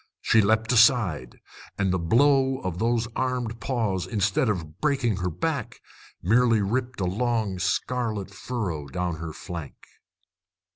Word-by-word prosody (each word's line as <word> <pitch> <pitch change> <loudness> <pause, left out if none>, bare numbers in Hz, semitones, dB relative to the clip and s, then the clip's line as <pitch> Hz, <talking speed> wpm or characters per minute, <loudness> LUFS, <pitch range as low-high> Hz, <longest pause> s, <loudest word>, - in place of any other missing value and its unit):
She 115 - +4
leapt 110 +3 +2
aside, 110 - +3 0.4
and 95 -2 +1
the 95 - 0
blow 135 +8 +3
of 90 -2 -4
those 115 +1 +1
armed 125 -3 -2
paws, 105 -8 -1
instead 100 +4 +1
of 80 -6 -4
breaking 130 -9 +1
her 90 -1 -1
back, 80 - -3 0.4
merely 115 +4 +4
ripped 125 +4 -2
a - - +1
long 110 -1 -1
scarlet 105 +2 -1
furrow 95 - -4
down 85 +4 -3
her 80 0 -6
flank. 80 -2 -7
110 Hz, 135 wpm, -25 LUFS, 90-120 Hz, 0.4 s, She